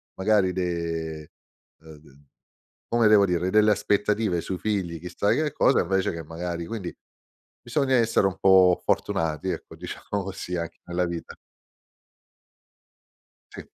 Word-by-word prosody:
magari 95 Hz, -1 st, +2 dB
de 85 Hz, -3 st, -3 dB, 0.5 s
uhm, 80 Hz, -1 st, -14 dB
d 70 Hz, -2 st, -20 dB, 0.7 s
come 115 Hz, -2 st, +3 dB
devo 105 Hz, -2 st, +6 dB
dire, 90 Hz, 0 st, 0 dB
delle 105 Hz, +1 st, +5 dB
aspettative 105 Hz, -2 st, +1 dB
sui 90 Hz, +2 st, -5 dB
figli 95 Hz, -6 st, -2 dB
chissà 90 Hz, +4 st, -1 dB
che 155 Hz, -2 st, 0 dB
cosa 135 Hz, -, +3 dB
invece 95 Hz, -1 st, 0 dB
che 85 Hz, -, -6 dB
magari 85 Hz, +1 st, -5 dB
quindi 100 Hz, -5 st, -5 dB, 0.7 s
bisogna 130 Hz, +2 st, 0 dB
essere 115 Hz, -4 st, +3 dB
un 95 Hz, -1 st, -4 dB
po' 95 Hz, -2 st, +5 dB
fortunati 80 Hz, +2 st, -1 dB
ecco, -, -, -6 dB
diciamo 100 Hz, -1 st, -5 dB
così, 90 Hz, -1 st, -5 dB
anche 85 Hz, 0 st, -6 dB
nella 90 Hz, +1 st, -1 dB
vita. 85 Hz, -1 st, -6 dB, 2.2 s
Sì. -, -, -8 dB
95 Hz, 130 wpm, -25 LUFS, 85-105 Hz, 2.2 s, devo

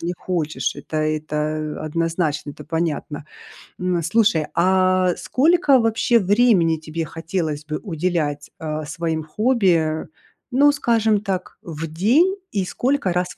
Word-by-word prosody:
не 175 Hz, +1 st, -3 dB
хочешь. 155 Hz, -8 st, -2 dB
Это 155 Hz, -, -7 dB
это 155 Hz, 0 st, -2 dB
однозначно, 160 Hz, -2 st, -1 dB
это 150 Hz, -, -12 dB
понятно. 160 Hz, -2 st, -3 dB, 0.5 s
М, 180 Hz, -2 st, 0 dB
слушай, 185 Hz, -2 st, +2 dB
а 185 Hz, 0 st, +3 dB
сколько 300 Hz, 0 st, +3 dB
вообще 225 Hz, +1 st, +2 dB
времени 195 Hz, -5 st, +3 dB
тебе 160 Hz, +1 st, -5 dB
хотелось 165 Hz, -2 st, -3 dB
бы 155 Hz, 0 st, -4 dB
уделять, 160 Hz, -5 st, -2 dB
а, 155 Hz, -1 st, -4 dB
своим 160 Hz, +1 st, -3 dB
хобби? 175 Hz, -5 st, +1 dB, 0.4 s
Ну, 280 Hz, +3 st, +5 dB
скажем 225 Hz, -7 st, +1 dB
так, 190 Hz, -3 st, -4 dB
в 165 Hz, -4 st, -6 dB
день- 245 Hz, -, +2 dB, 0.2 s
и 195 Hz, -3 st, -1 dB
сколько 260 Hz, -1 st, 0 dB
раз 180 Hz, 0 st, 0 dB
170 Hz, 125 wpm, -21 LUFS, 155-210 Hz, 0.5 s, Ну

